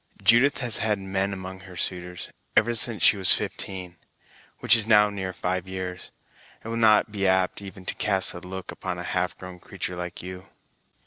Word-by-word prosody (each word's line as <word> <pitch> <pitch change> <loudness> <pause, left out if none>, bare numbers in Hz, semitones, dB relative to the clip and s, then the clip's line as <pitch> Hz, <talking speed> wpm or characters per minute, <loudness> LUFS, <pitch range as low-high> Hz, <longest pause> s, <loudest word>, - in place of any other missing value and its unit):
Judith 120 +7 +5
has 120 -4 +2
had 105 -1 +2
men 95 0 -2
among 95 -1 -7
her 90 -1 -12
suitors, 90 0 -4 0.3
ever 120 +2 +4
since 115 -1 +1
she 105 - +7
was 95 -2 +1
fifteen; 90 -3 -4 0.6
which - - +5
is 110 -2 0
now 105 -2 +6
near 95 -2 -4
five 90 +1 -2
years; 95 -1 -6 0.5
and 115 - -6
will 115 - -2
not 110 -1 +5
be 100 -2 0
apt 95 +1 +2
even 95 -1 -10
to - - -2
cast 95 -3 0
a 90 - -7
look 95 +1 -7
upon 95 -1 -5
a 90 - -5
half 90 0 -1
grown 90 -1 -10
creatur' 90 - -6
like 90 0 -6
you!" 90 +1 -8
95 Hz, 190 wpm, -26 LUFS, 90-105 Hz, 0.6 s, she